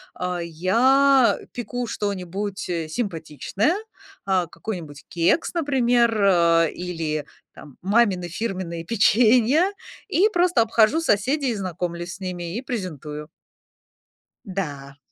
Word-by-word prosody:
А, 180 -1 -3
я, 245 - +3
а, - - -13
пеку 245 +1 -4
что-нибудь, 200 -2 -4
э, 165 -2 -2
симпатичное, 190 - -2 0.5
а, 185 -3 +1
какой-нибудь 165 -9 -7
кекс, 175 - +1
например, 245 -7 +2
а, 170 -3 +4
или 160 -4 -3 0.3
там 145 -4 -14
мамины 195 -4 +2
фирменные 180 -4 -4
печенья, 235 - +4 0.4
и 390 +1 +3
просто 355 - +2
обхожу 225 +7 +3
соседей, 265 +2 +1
и - - -2
знакомлюсь 175 -2 -4
с - - -15
ними, 180 -1 -5
и - - -3
презентую. 155 - -5 1.2
Да. 145 -8 -5
195 Hz, 110 wpm, -23 LUFS, 170-240 Hz, 1.2 s, а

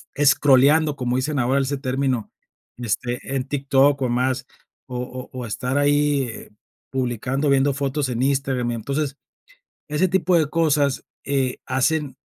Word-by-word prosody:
escroleando, 145 +1 +4
como 125 -2 -1
dicen 140 +3 -1
ahora, 130 +3 +2
ese 140 +1 -1
término, 130 -3 -1 0.5
de 120 -1 -6
este, 125 +5 -2
en 130 -1 -1
TikTok 140 0 +2
o 125 - 0
más, 130 +2 0 0.4
o 125 -1 -5
o 125 +1 -7
o 125 -2 -5
estar 125 +6 -2
ahí, 145 -1 +2
eh, 115 -3 -8 0.4
publicando, 130 +2 -1
viendo 140 0 +3
fotos 140 0 -1
en 120 0 -2
Instagram, 135 -3 0
y - - -2
entonces, 140 +5 -3 0.7
ese 150 +5 +1
tipo 180 -1 +2
de 155 -3 +2
cosas, 150 -4 +1 0.2
eh, 135 -2 -1
hacen 145 +2 0
135 Hz, 150 wpm, -22 LUFS, 125-145 Hz, 0.7 s, escroleando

